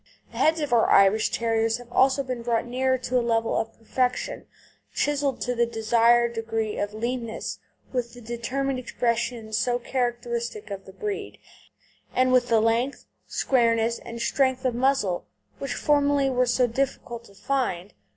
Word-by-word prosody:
The - - -8
heads 320 +1 +3
of 290 -5 -1
our 230 - +4
Irish 195 +2 +5
Terriers 225 0 +1
have 245 -1 -14
also 265 +2 +3
been 255 -2 -4
brought 230 -1 0
nearer 260 +2 +1
to 255 0 0
a - - +1
level 230 -1 +1
of 225 0 -2
perfection, 250 - -2 0.4
chiselled 285 -2 0
to 250 - -1
the 235 -1 +2
desired 235 +1 +3
degree 225 -1 -2
of 205 +1 -3
leanness, 235 0 -3 0.3
with 240 -2 -2
the - - -10
determined 255 +4 -2
expression 235 -2 -2
so 240 +3 +1
characteristic 235 -3 -3
of 195 -1 -6
the - - -11
breed, 415 - -5 0.8
and 255 0 +3
with 250 -1 +4
the 225 -2 +4
length, 230 +5 0 0.2
squareness, 230 -2 +2
and 235 0 -8
strength 260 +1 +1
of 255 - +2
muzzle 240 -8 +1 0.3
which 275 -3 -3
formerly 285 -2 +2
were 250 0 +2
so 245 +1 +3
difficult 240 -1 -3
to 200 - -18
find. 205 -7 -2
240 Hz, 160 wpm, -25 LUFS, 225-260 Hz, 0.8 s, Irish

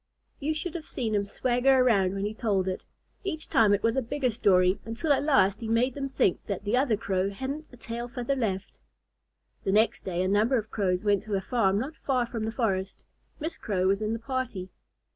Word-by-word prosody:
You 310 +2 -1
should 315 +2 -3
have 335 -3 -6
seen 225 -4 -2
him 200 -1 +1
swagger 250 +5 +2
around 200 -7 +3
when 195 +1 -2
he 210 - -2
told 205 -5 0
it. 185 - -3 0.4
Each 315 -5 -3
time 215 -3 +4
it 205 0 +2
was 230 0 +2
a 265 - +2
bigger 255 +1 -1
story, 185 -3 +3
until 230 +7 0
at - - +1
last 200 -10 +3
he 225 - -5
made 235 +3 +2
them 275 0 -4
think 195 -8 +1
that 200 -2 -3
the 210 +3 +1
other 250 -4 +2
Crow 195 -3 0
hadn't 270 +9 -5
a 245 - -14
tail 235 +1 -5
feather 245 +3 -2
left. 205 -6 -3 0.8
The - - 0
next 215 +3 +2
day, 180 -1 -1
a - - 0
number 215 +7 +3
of 220 -1 -4
Crows 185 -2 0
went 205 -2 +3
to 210 -2 -2
a - - +1
farm 195 -3 +1
not 275 +9 -3
far 255 -5 0
from 230 -2 -4
the 220 - -2
forest. 195 -5 -2 0.4
Miss 320 +2 -4
Crow 185 -4 -1
was 195 +2 +2
in 215 +1 -1
the - - -1
party. 230 -6 -4
225 Hz, 220 wpm, -28 LUFS, 195-260 Hz, 0.8 s, time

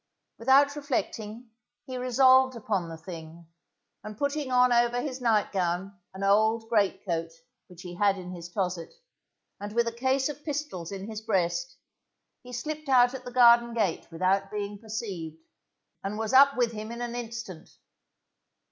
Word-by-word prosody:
Without 275 +4 +4
reflecting, 235 -5 -4 0.3
he 260 - -7
resolved 260 +1 +4
upon 205 -6 -2
the 165 - -7
thing, 165 -1 -10 0.6
and 215 -1 -8
putting 285 0 -2
on 250 0 +5
over 240 0 +3
his 260 0 -4
nightgown 195 -4 0 0.2
an 195 - -5
old 220 +3 +3
great 210 -3 +1
coat 165 -3 -2 0.4
which 180 -1 -13
he 175 -1 -8
had 200 0 +3
in 180 -1 -8
his 175 -1 -8
closet 180 -3 -3 0.7
and 205 +1 -6
with 235 0 +2
a - - 0
case 260 +3 0
of 295 -1 -7
pistols 285 - -4
in 195 0 -6
his 220 -1 -6
breast, 185 0 -1 0.6
he 250 - -12
slipped 305 +4 -5
out 245 -1 +5
at 265 - -8
the 250 - -7
garden 235 -1 +5
gate 205 -7 -1
without 190 +4 +1
being 205 0 -5
perceived, 200 -8 -6 0.7
and 200 +2 -3
was 225 +2 -3
up 275 +1 +7
with 240 -2 +2
him 215 0 -7
in 235 +1 -5
an 240 -1 -4
instant. 230 -7 -7
225 Hz, 160 wpm, -27 LUFS, 190-250 Hz, 0.7 s, up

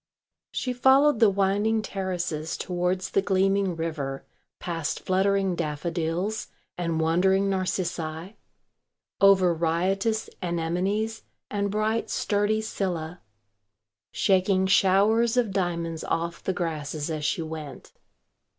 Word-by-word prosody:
She 255 - -2
followed 265 +1 +4
the 225 - +6
winding 200 +3 +1
terraces 180 -6 -3
towards 180 +1 -2
the 195 - +3
gleaming 195 -1 +1
river, 150 -5 -4 0.3
past 165 -3 -3
fluttering 195 0 +1
daffodils 170 +6 -2 0.3
and 170 -2 -2
wandering 190 +5 +2
narcissi, 180 -1 -3 0.9
over 190 -3 +6
riotous 190 +7 0
anemones 185 +6 -1 0.3
and 200 -1 -1
bright 215 +2 -1
sturdy 205 +1 0
scyllæ, 175 -5 -3 0.9
shaking 190 0 +2
showers 205 +5 +3
of 235 -5 +2
diamonds 170 -4 -2
off 170 +1 -2
the - - 0
grasses 155 -3 -3
as 155 -1 -3
she 165 +2 0
went. 155 -4 -8
185 Hz, 105 wpm, -26 LUFS, 165-200 Hz, 0.9 s, the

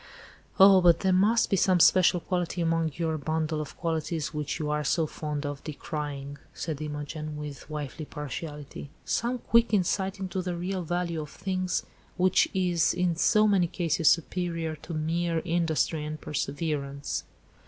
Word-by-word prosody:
"Oh! 190 -1 +8
but 170 -2 +5
there 190 -1 +2
must 210 +5 +3
be - - +4
some 185 -1 +3
special 180 +1 +5
quality 180 0 -2
among 165 -1 +1
your 160 -2 -1
bundle 155 +1 -1
of 150 - -8
qualities 160 -2 -2
which 150 -2 -3
you 155 - -3
are 150 0 0
so 160 +3 +1
fond 150 -1 -4
of 145 -1 -5
decrying," 145 -2 -5 0.2
said 155 -3 -4
Imogen, 150 0 -5
with 150 -1 -8
wifely 150 +1 -5
partiality; 150 0 -7 0.2
"some 240 +2 0
quick 230 -2 +3
insight 190 +1 0
into 190 -1 -3
the 180 -1 -3
real 185 +2 -3
value 170 -1 -2
of 150 - -7
things, 185 +2 -2 0.3
which 185 0 +4
is 180 -4 +1
in 180 -1 +1
so 215 +5 +4
many 190 -4 +3
cases 165 -2 +2
superior 165 -1 0
to 160 +3 -7
mere 165 +2 0
industry 165 -2 0
and 155 0 -5
perseverance." 140 -1 -3
165 Hz, 155 wpm, -28 LUFS, 150-180 Hz, 0.3 s, Oh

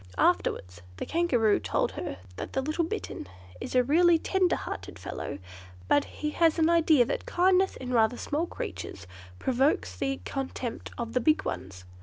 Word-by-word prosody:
Afterwards 90 -2 +1 0.2
the - - -4
Kangaroo 255 -11 +2
told 95 -2 0
her 90 - -5 0.2
that - - -6
the 265 - +1
little 310 +4 0
Bittern 335 - -5 0.3
is - - -5
a 250 - +5
really 335 +6 +5
tender 370 +2 +1
hearted - - -6
fellow, - - -5 0.5
but 290 - +3
he 300 0 -4
has 325 +1 +3
an 325 0 +4
idea 320 -6 +5
that 245 - -3
kindness 375 -3 +3
in 255 -1 -5
rather 230 +1 +3
small 310 +4 -1
creatures 385 - -6 0.3
provokes 265 - +1
the 270 0 -2
contempt 265 -3 -4
of 235 -1 -4
the 250 - +2
big 310 +6 +3
ones. 90 -1 -5
285 Hz, 165 wpm, -28 LUFS, 235-335 Hz, 0.5 s, a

